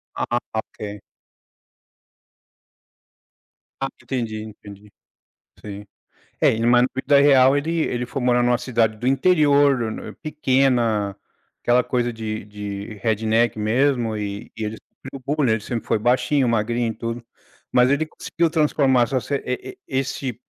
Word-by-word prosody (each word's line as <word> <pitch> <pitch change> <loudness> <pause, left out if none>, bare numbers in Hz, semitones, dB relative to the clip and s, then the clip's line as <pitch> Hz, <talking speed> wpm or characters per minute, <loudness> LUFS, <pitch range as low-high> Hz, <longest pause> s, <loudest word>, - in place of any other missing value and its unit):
Ah, 120 0 -1
ok. 105 -2 -6 2.8
Ah, 135 - +1
entendi, 115 -5 -3
entendi. 105 -1 -12 0.7
Sim. 105 0 -8 0.5
É, - - +5
em 115 +1 0
mas 120 0 +5
na 125 - +2
vida 140 +2 +3
real, 135 -1 +6
ele 165 +3 -1
ele 125 -5 -1
foi 135 - -4
morar 125 0 +3
numa 120 0 +2
cidade 115 -4 0
do 120 +4 -5
interior 145 -1 +4
no 115 -2 -2
no - - -7
pequena, 130 - +1 0.5
aquela 120 +1 +3
coisa 120 -1 -1
de 110 -2 -5
de 105 0 -7
redneck 110 +2 +1
mesmo 115 +1 +1
e 100 -1 -5
e 110 - -3
ele 105 +1 -4
sofreu 135 +3 -12
bullying, 135 -7 +2
ele 110 - 0
sempre 115 +2 -5
foi - - +1
baixinho, 125 +4 +2
magrinho 115 +1 0
e - - -14
tudo, 115 0 -5 0.5
mas 125 +1 +4
ele 145 +3 +1
conseguiu 165 +1 -2
transformar 145 -5 +3
essa 130 +2 -1
se 140 - -2
e 125 +1 -3
e - - -23
esse 130 -2 -3
120 Hz, 145 wpm, -22 LUFS, 110-135 Hz, 2.8 s, real